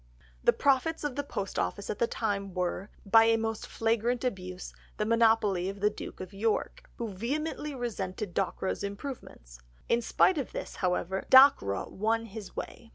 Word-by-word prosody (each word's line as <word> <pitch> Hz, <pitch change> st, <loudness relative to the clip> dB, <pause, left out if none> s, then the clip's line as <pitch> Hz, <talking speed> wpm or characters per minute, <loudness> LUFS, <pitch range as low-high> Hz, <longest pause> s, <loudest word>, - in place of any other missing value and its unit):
The -, -, +6 dB
profits 285 Hz, +4 st, +1 dB
of 290 Hz, -4 st, -2 dB
the 285 Hz, -, 0 dB
post 200 Hz, -8 st, -4 dB
office 200 Hz, -, -2 dB
at -, -, -6 dB
that 235 Hz, -, +2 dB
time 200 Hz, -4 st, -2 dB
were, 180 Hz, +2 st, -2 dB, 0.2 s
by 225 Hz, +3 st, +6 dB
a 225 Hz, 0 st, +4 dB
most 225 Hz, -1 st, -3 dB
flagrant 230 Hz, +2 st, 0 dB
abuse, 185 Hz, -6 st, -4 dB, 0.2 s
the 210 Hz, -, 0 dB
monopoly 220 Hz, -5 st, +3 dB
of 195 Hz, +1 st, -7 dB
the 210 Hz, +1 st, +2 dB
Duke -, -, -8 dB
of 185 Hz, +1 st, -8 dB
York, 225 Hz, -, -2 dB
who 230 Hz, -2 st, -4 dB
vehemently 295 Hz, +7 st, -3 dB
resented 205 Hz, -6 st, -4 dB
Dockwra's 190 Hz, +1 st, -1 dB
improvements. 200 Hz, -, -7 dB, 0.3 s
In 235 Hz, -, +3 dB
spite 320 Hz, +8 st, +3 dB
of 270 Hz, -, -5 dB
this, -, -, -6 dB
however, 185 Hz, +1 st, -1 dB
Dockwra 260 Hz, -, +6 dB
won 225 Hz, +3 st, 0 dB
his 215 Hz, -2 st, -9 dB
way. 235 Hz, -, -7 dB
220 Hz, 165 wpm, -29 LUFS, 195-240 Hz, 0.3 s, The